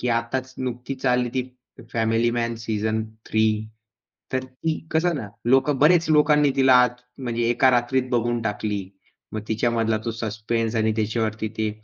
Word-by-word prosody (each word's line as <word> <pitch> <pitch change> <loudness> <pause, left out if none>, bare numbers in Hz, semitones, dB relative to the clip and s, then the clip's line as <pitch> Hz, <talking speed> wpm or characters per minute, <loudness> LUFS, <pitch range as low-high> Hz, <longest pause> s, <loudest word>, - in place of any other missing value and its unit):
की 125 - -1
आताच 120 +3 -1
नुकतीच 130 +1 -5
चालली 125 -1 +2
ती 130 - +1 0.5
फॅमिली 115 +1 +2
मॅन 115 0 -1
सीझन 110 -1 -1 0.2
3 110 0 +2 0.9
तर 130 0 -1
ती 130 +5 -3
कसं 170 +2 +2
ना, 110 -7 -5 0.2
लोक 135 +3 +4
बरेच 165 +2 +5
लोकांनी 150 -1 +4
तिला 130 -1 +5
आत 125 0 0 0.2
म्हणजे 120 -2 -2
एका 130 +2 +4
रात्रीत 125 +1 +1
बघून 120 -1 0
टाकली. 105 -2 -3 0.4
मग 110 - -3
तिच्यामधला 115 0 +1
तो 115 - -1
सस्पेन्स 115 +1 -2
आणि 110 0 +2
त्याच्यावरती 110 0 -1
ते 110 -1 0
120 Hz, 150 wpm, -23 LUFS, 110-130 Hz, 0.9 s, बरेच